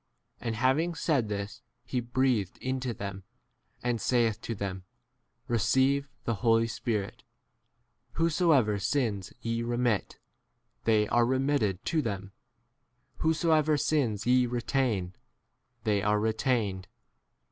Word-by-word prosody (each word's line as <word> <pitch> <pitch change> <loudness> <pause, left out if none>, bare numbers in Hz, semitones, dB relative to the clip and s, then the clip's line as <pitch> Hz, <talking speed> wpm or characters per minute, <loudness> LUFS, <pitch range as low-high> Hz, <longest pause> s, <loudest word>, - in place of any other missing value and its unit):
And 115 -1 -3
having 135 +9 +2
said 140 -10 +1
this 105 +3 -4 0.2
he 125 0 -1
breathed 120 -5 0
into 130 -1 -2
[them], 100 -3 -6 0.6
and 120 -2 0
saith 115 -3 +1
to 115 - -4
them, 95 -2 -4 0.6
Receive 130 +4 +2
[the] 115 - 0
Holy 115 -1 +4
Spirit: 110 -3 -2 1.0
23 165 - 0
whosoever 150 - +3
sins 105 -3 -1
ye 115 0 -1
remit, 120 -2 0 0.7
they 110 -2 +3
are 120 - +4
remitted 130 -7 0
to 160 -2 +1
them; 100 -6 -4 0.9
whosoever 160 -1 +2
sins 135 -8 0
ye 125 0 +4
retain, 120 -6 -1 0.7
they 105 -2 +1
are 105 +1 +2
retained. 110 -4 0
120 Hz, 115 wpm, -29 LUFS, 105-130 Hz, 1.0 s, Holy